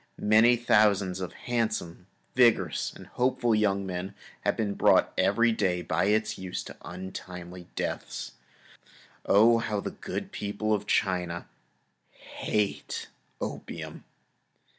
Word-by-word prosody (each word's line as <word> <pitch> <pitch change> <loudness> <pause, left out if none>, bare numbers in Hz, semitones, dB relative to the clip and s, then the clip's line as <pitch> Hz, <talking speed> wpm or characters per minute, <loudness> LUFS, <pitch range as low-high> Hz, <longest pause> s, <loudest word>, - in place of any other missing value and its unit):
Many 110 +3 +5
thousands 105 -5 +3
of 90 - -4
handsome, 110 -7 -2 0.3
vigorous, 120 -3 +3
and - - -12
hopeful 125 -2 +1
young 100 -2 +2
men 90 +1 -4 0.3
are - - +3
brought 105 -3 +2
every 100 +5 +3
day 90 -5 0
by 80 +2 +1
its 110 +2 +1
use 95 -1 -4
to - - -10
untimely 90 0 -8
deaths. - - -4 1.0
Oh! 115 +3 +6
how 105 -2 -1
the - - -4
good - - -5
people 105 +1 -2
of 105 0 -1
China 90 -3 0 0.7
hate 105 -2 -3 0.3
opium. - - -6
100 Hz, 115 wpm, -28 LUFS, 90-110 Hz, 1.0 s, Oh